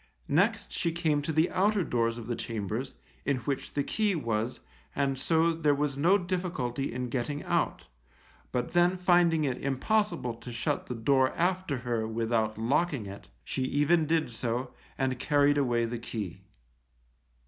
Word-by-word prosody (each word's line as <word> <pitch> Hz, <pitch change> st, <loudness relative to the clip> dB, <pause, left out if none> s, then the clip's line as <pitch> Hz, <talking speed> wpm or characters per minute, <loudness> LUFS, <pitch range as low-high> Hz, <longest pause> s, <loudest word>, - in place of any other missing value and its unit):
Next 205 Hz, +6 st, +2 dB
she 170 Hz, -, 0 dB
came 160 Hz, -3 st, +1 dB
to 145 Hz, -, -2 dB
the 160 Hz, +2 st, +2 dB
outer 200 Hz, +1 st, +2 dB
doors 115 Hz, -4 st, 0 dB
of 120 Hz, -, -7 dB
the 120 Hz, +1 st, -2 dB
chambers, 115 Hz, +4 st, -4 dB, 0.3 s
in 140 Hz, -2 st, +1 dB
which 140 Hz, 0 st, -3 dB
the 145 Hz, -, +1 dB
key 210 Hz, +4 st, +1 dB
was, 115 Hz, -5 st, -2 dB, 0.3 s
and 140 Hz, -1 st, +1 dB
so 165 Hz, +4 st, +2 dB
there 150 Hz, -3 st, +2 dB
was 145 Hz, -1 st, -1 dB
no 170 Hz, +8 st, +4 dB
difficulty 175 Hz, -8 st, -2 dB
in 125 Hz, +1 st, -3 dB
getting 140 Hz, +3 st, -2 dB
out; -, -, 0 dB, 0.7 s
but 125 Hz, +3 st, -2 dB
then 175 Hz, +1 st, +4 dB
finding 175 Hz, -3 st, +4 dB
it 130 Hz, -4 st, -1 dB
impossible 150 Hz, -, 0 dB
to 115 Hz, +2 st, -10 dB
shut 115 Hz, 0 st, -2 dB
the 125 Hz, -, -4 dB
door 130 Hz, +3 st, +3 dB
after 180 Hz, -4 st, 0 dB
her 115 Hz, -2 st, 0 dB
without 110 Hz, -1 st, 0 dB
locking 135 Hz, +2 st, +1 dB
it, 100 Hz, 0 st, -9 dB, 0.2 s
she -, -, -3 dB
even 145 Hz, +5 st, +2 dB
did 160 Hz, -5 st, +1 dB
so, 120 Hz, +2 st, -3 dB, 0.2 s
and 130 Hz, -2 st, 0 dB
carried 145 Hz, 0 st, +3 dB
away 120 Hz, -4 st, +2 dB
the 120 Hz, +1 st, -4 dB
key. 105 Hz, -7 st, -5 dB
140 Hz, 160 wpm, -29 LUFS, 120-165 Hz, 0.7 s, no